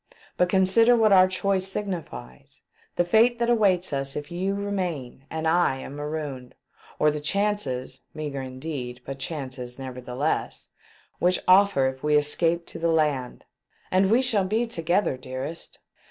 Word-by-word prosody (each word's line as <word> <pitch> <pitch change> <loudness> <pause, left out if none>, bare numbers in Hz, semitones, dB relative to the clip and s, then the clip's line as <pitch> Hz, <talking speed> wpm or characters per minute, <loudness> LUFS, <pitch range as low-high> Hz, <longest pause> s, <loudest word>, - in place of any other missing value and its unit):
But 180 - +2
consider 195 +6 +5
what 220 -2 +4
our 185 -1 +7
choice 190 0 0
signifies; 165 - -7 0.3
the 175 - +2
fate 225 +6 +4
that 235 0 +1
awaits 190 -8 +2
us 135 0 -1
if 150 +3 -6
you 190 +3 -1
remain 180 -11 -4
and 160 0 -4
1 160 - +3 0.2
am 135 - -8
marooned; 145 -4 -5 0.4
or 150 - +3
the 150 - -4
chances 155 -6 -2
— - - -48
meagre 145 -3 -4
indeed, 130 -1 -6
but 135 0 -6
chances, 130 -5 -5
never 130 -2 -7
theless— 125 +5 -3 0.5
which 180 +1 +3
offer 185 -7 +5
if 130 0 -5
we 150 0 +2
escape 165 +3 +1
to - - -9
the 170 0 +1
land. 150 -6 0 0.5
And 190 +1 +3
we 240 +5 +4
shall 220 -6 +2
be 220 +5 0
together, 175 - 0
dearest 130 +5 -7
160 Hz, 155 wpm, -25 LUFS, 135-195 Hz, 0.5 s, our